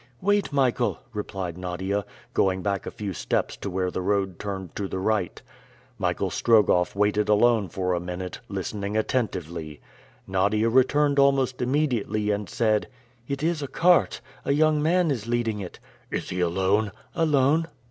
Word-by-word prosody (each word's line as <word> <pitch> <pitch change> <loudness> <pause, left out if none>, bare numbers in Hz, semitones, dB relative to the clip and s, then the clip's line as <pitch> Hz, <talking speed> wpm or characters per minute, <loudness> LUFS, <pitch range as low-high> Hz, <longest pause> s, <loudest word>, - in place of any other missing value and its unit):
"Wait, 205 -5 +1
Michael!" 130 -3 +1 0.2
replied 95 -4 -4
Nadia, 95 +2 -2 0.3
going 95 -1 +1
back 100 -2 -1
a - - -1
few 100 -3 -5
steps - - -1
to 100 - -5
where 90 0 -1
the 95 - -3
road 95 -2 0
turned 95 -3 -5
to 100 - -2
the 95 - -4
right. 100 -1 -1 0.6
Michael - - -1
Strogoff 105 -7 +3
waited 105 +1 +1
alone 105 -2 +4
for 90 0 -1
a 90 - 0
minute, 90 +1 -5
listening 100 +1 -3
attentively. 85 - -2 0.5
Nadia 100 +4 +1
returned 140 +4 +3
almost 135 -2 +3
immediately 125 -6 0
and 105 -1 -2
said, 110 -2 +1 0.4
"It 140 +1 -3
is 165 -1 0
a 140 - -3
cart. 175 +5 +3 0.2
A 140 - +1
young 155 0 +3
man 170 +1 +2
is 115 -5 -3
leading 115 -3 0
it." 90 -3 -8 0.3
"Is - - -3
he 90 - -3
alone?" 95 +4 +1 0.2
"Alone." 155 -1 +2
105 Hz, 155 wpm, -25 LUFS, 95-130 Hz, 0.6 s, alone